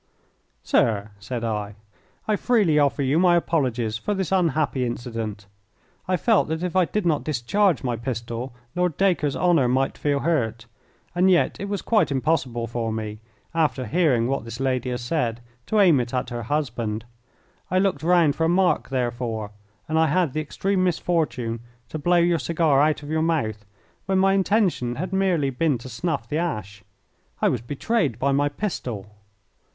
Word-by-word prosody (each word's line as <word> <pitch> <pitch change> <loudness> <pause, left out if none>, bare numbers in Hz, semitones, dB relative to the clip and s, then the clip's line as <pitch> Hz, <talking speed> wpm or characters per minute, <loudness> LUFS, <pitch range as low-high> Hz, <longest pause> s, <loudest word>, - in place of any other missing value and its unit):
"Sir," 105 -2 +1
said 115 +3 -5
I, 105 -2 -3 0.5
"I 215 - +2
freely 205 -10 +3
offer 140 0 +2
you 140 +5 +2
my 175 -1 +5
apologies 125 -10 0
for 205 - -2
this 190 -4 -2
unhappy 155 -7 +1
incident. 115 -4 -4 0.6
I 185 0 +2
felt 225 +3 +3
that 160 +2 -3
if 180 0 -3
I 185 -1 +4
did 210 +2 -2
not 155 -4 +1
discharge 155 - +1
my 125 -2 -1
pistol 120 +1 -4 0.2
Lord 180 -3 0
Dacre's 175 -7 +2
honour 170 -8 +3
might 130 +2 0
feel 145 -1 0
hurt, 120 -8 0 0.5
and 180 +2 +3
yet 180 -2 +2
it 200 - -4
was 200 -1 -3
quite 220 -7 +2
impossible 130 -4 0
for 115 -1 -3
me, 110 -1 -4 0.3
after 155 -5 +1
hearing 130 -3 +2
what 135 -1 -1
this 115 +1 -8
lady 130 -1 0
has 125 0 -3
said, 120 -3 -1 0.3
to 215 - +2
aim 175 -9 +6
it 125 +1 -3
at 125 0 -2
her 120 0 -3
husband. 115 -7 -2 0.6
I 185 - +1
looked 195 0 +1
round 165 -3 +3
for 160 - +1
a - - +2
mark, 180 +1 +2
therefore, 120 -4 -2 0.4
and 160 +1 +1
I 160 - +4
had 160 -2 +1
the 155 - -1
extreme 190 +5 -1
misfortune 155 -10 0 0.3
to 155 - -5
blow 175 +4 +3
your 170 -1 +3
cigar 155 -3 +2
out 150 0 +1
of 145 - -8
your 160 0 +1
mouth 110 -11 -1 0.4
when 190 0 +2
my 195 +1 +4
intention 190 - +1
had 180 +6 -4
merely 180 -8 +1
been 145 0 +1
to 120 +3 -10
snuff 130 0 -3
the 150 - -1
ash. 105 - -4 0.6
I - - +3
was 120 - -1
betrayed 145 - -1
by 140 +3 +1
my 145 +1 +2
pistol. 130 - -4
145 Hz, 175 wpm, -24 LUFS, 120-175 Hz, 0.6 s, aim